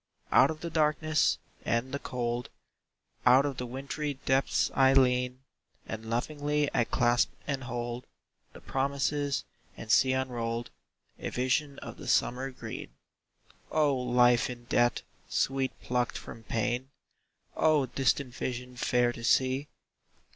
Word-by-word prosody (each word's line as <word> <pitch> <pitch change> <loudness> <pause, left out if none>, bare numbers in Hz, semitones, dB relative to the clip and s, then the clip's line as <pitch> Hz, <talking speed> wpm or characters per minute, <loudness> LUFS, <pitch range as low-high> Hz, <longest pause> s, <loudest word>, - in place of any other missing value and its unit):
Out - - +6
of 155 -1 -5
the 170 - -4
darkness 155 0 +2 0.3
and 115 +3 0
the 140 - -2
cold, 120 -2 -3 0.7
Out 130 +3 +6
of 140 -3 -2
the 125 - -4
wintry 140 +3 -4
depths 135 +1 +2
I 135 0 +5
lean, 125 -1 +2 0.4
And 110 0 -6
lovingly 145 +4 0
I 120 - +3
clasp 120 +1 +2 0.2
and 135 -3 -3
hold 120 0 -4 0.5
The - - -12
promises, 140 +1 -1 0.3
and 110 - -4
see 130 +1 +5
unrolled 120 -3 -2 0.5
A - - -3
vision 135 +3 0
of - - -8
the - - -9
summer 130 +2 +1
green. 130 - -8 0.7
O, 150 -3 +2
life 125 -2 +3
in 120 -1 -7
death, 120 -1 +2 0.3
sweet 135 0 0
plucked 125 -1 0
from 115 - -10
pain! 120 +4 -1 0.7
O, 155 -3 +3
distant 130 0 0
vision 125 0 -4
fair 120 0 +2
to 115 - -9
see! 130 +3 +2
130 Hz, 135 wpm, -29 LUFS, 120-140 Hz, 0.7 s, Out